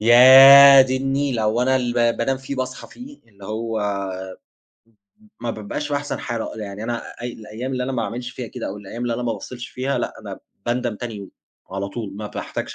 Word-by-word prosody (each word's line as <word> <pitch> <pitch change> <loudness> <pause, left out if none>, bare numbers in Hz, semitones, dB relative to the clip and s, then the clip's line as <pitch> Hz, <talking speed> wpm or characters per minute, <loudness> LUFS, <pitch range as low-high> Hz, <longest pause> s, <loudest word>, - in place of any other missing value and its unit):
يادي 130 +3 +9
النيلة 135 -3 -1
هو 110 +3 +1
أنا 130 +1 +2
اللي 120 -2 -1 0.2
ب - - -11
بانام 130 +3 0
فيه 135 +1 -7
باصحى 130 0 -5
فيه، 275 +4 -12
اللي 100 -2 -16
هو 110 +2 -4 1.6
ما 120 - -3
بابقاش 110 +7 -5
في 145 - -1
أحسن 145 0 -4
حالة. 115 -2 -4
يعني 105 -1 -7
أنا 115 +1 -3 0.2
أي 120 - -4
الأيام 115 +5 -7
اللي 125 -1 -2
أنا 135 - -4
ما 120 -3 -1
أعملش 120 +2 -5
فيها 125 -1 -7
كده - - -7
أو 100 - -6
الأيام 105 +4 -8
اللي 120 -1 -1
أنا 125 - -4
ما 120 - -1
بافصلش 120 +4 -8
فيها، 135 +2 -3
لأ - - -3
أنا - - -8 0.3
باندم 120 -2 -1
تاني 120 -1 -6
يوم، 100 -1 -10 0.4
على 100 +1 -4
طول 100 -2 -7
ما 105 0 -6
باحتاجش - - -6
120 Hz, 205 wpm, -21 LUFS, 110-130 Hz, 1.6 s, يادي